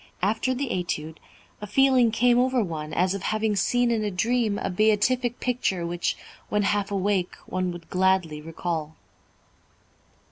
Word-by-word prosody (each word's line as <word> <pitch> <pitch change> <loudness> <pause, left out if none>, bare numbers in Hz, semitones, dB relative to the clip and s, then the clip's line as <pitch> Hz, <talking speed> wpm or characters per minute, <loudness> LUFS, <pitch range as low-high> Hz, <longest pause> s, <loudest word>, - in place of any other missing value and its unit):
After 225 +6 +1
the 270 0 -2
Étude, 160 -5 -3 0.4
a 210 - -5
feeling 260 +1 +4
came 240 +2 +3
over 255 -1 +2
one 155 -4 -5
as 180 +3 +1
of 200 - -4
having 215 -1 0
seen 245 +4 +2
in 225 -2 0
a 210 - 0
dream 220 +2 0
a - - -2
beatific 220 +5 +2
picture 230 -8 -1
which, 175 +1 -2 0.3
when 210 0 +1
half 200 0 0
awake, 195 -2 0
one 185 -1 -2
would 175 -1 -10
gladly 185 -5 +1
recall." 160 -1 -4
205 Hz, 150 wpm, -25 LUFS, 180-235 Hz, 0.4 s, feeling